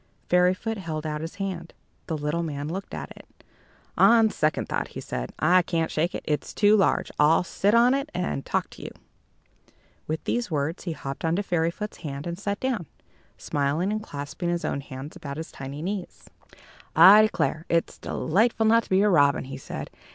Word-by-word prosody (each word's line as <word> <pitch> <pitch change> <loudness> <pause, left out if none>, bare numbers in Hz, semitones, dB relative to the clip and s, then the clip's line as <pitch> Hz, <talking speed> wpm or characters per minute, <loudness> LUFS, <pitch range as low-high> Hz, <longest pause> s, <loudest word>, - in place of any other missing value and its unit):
Fairyfoot 185 +5 +2
held 160 -4 -4
out 150 -1 -3
his 165 +4 -6
hand. 185 -4 -5 0.3
The 160 - -2
little 150 +3 -1
man 145 -3 -4
looked 190 +5 -5
at - - -7
it. - - -15 0.7
"On 225 -2 +6
second 155 0 0
thought," - - -2
he - - -8
said, - - -5
"I 180 +4 +4
can't 165 -2 -1
shake 165 +3 0
it - - -5
it's 150 -1 -2
too 205 0 +5
large. 195 - +2
I'll 150 +3 +5
sit 200 +4 +1
on 240 +2 +5
it, 275 +2 -1
and 180 - -2
talk - - -2
to - - -12
you." - - -6 1.2
With 155 +1 -3
these 240 -3 -1
words, 155 +3 -2
he 170 - -2
hopped 140 -2 -7
upon 165 0 +1
Fairyfoot's 180 +1 -2
hand, 140 -2 -6
and 170 0 -3
sat 205 0 -2
down, 240 - -2 0.5
smiling 150 +7 -1
and 215 0 -2
clasping 145 -1 -5
his 175 -1 -1
own 140 - -2
hands 135 +2 -9
about 140 -1 -7
his 160 +1 -6
tiny 140 +3 -7
knees. 190 0 -5 0.7
"I 205 +3 +9
declare, 175 -7 0
it's 170 0 0
delightful 220 +6 +1
not 230 +1 +5
to - - -19
be 190 +1 +4
a - - +4
robin," 145 -6 +4
he 135 - -7
said. - - -7
170 Hz, 190 wpm, -26 LUFS, 150-200 Hz, 1.2 s, I